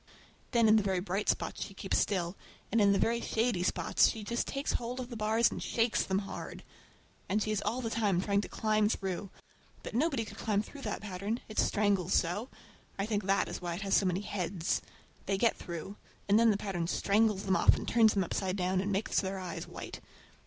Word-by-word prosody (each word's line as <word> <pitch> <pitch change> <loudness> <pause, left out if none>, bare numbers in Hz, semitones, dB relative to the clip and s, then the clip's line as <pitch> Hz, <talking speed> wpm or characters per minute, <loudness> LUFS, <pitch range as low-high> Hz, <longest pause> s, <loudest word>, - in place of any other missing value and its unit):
Then 235 -3 +4
in 215 +1 +7
the - - +4
very 190 -2 0
bright 195 +2 -2
spots - - -1
she 195 - -9
keeps 195 - 0
still, 185 -3 0 0.4
and 225 +1 +3
in 200 -1 +5
the 200 - +3
very 235 +3 +1
shady 225 -5 0
spots 180 - +3
she 220 - -5
just 235 +3 -2
takes 275 +1 -2
hold 245 +2 -3
of 250 0 -6
the - - -5
bars 220 +2 +2
and - - -5
shakes 230 0 +1
them 190 - 0
hard. - - -7 0.7
And 205 +3 +2
she 215 - -2
is 215 - 0
all 230 +5 -1
the 225 -2 -3
time 205 -6 +1
trying 200 +1 +1
to - - -7
climb 215 -1 +1
through. 195 -2 -3 0.5
But - - -7
nobody 265 -2 +1
could - - -11
climb 210 -2 +1
through 280 +5 -11
that - - -3
pattern—it 210 +3 -4
strangles 200 -3 +2
so; 195 +9 0 0.5
I 195 - -1
think 210 -2 -1
that 195 0 +2
is - - -6
why 175 -1 -3
it 185 - -6
has 195 -1 +2
so 195 - +3
many 180 +2 0
heads. 185 -4 -2 0.5
They 195 0 +1
get 230 +3 +3
through, 170 +4 -7 0.3
and 205 +2 +5
then 230 0 +5
the 205 - +3
pattern 190 -5 -3
strangles 205 +2 +2
them 190 -1 +2
off - - +5
and - - -6
turns 225 -2 +4
them 195 - +2
upside 185 +1 -2
down, 185 -1 +1
and 200 +1 -2
makes 200 +2 +1
their 190 0 -3
eyes 180 -2 -5
white! - - -8
205 Hz, 220 wpm, -31 LUFS, 190-225 Hz, 0.7 s, in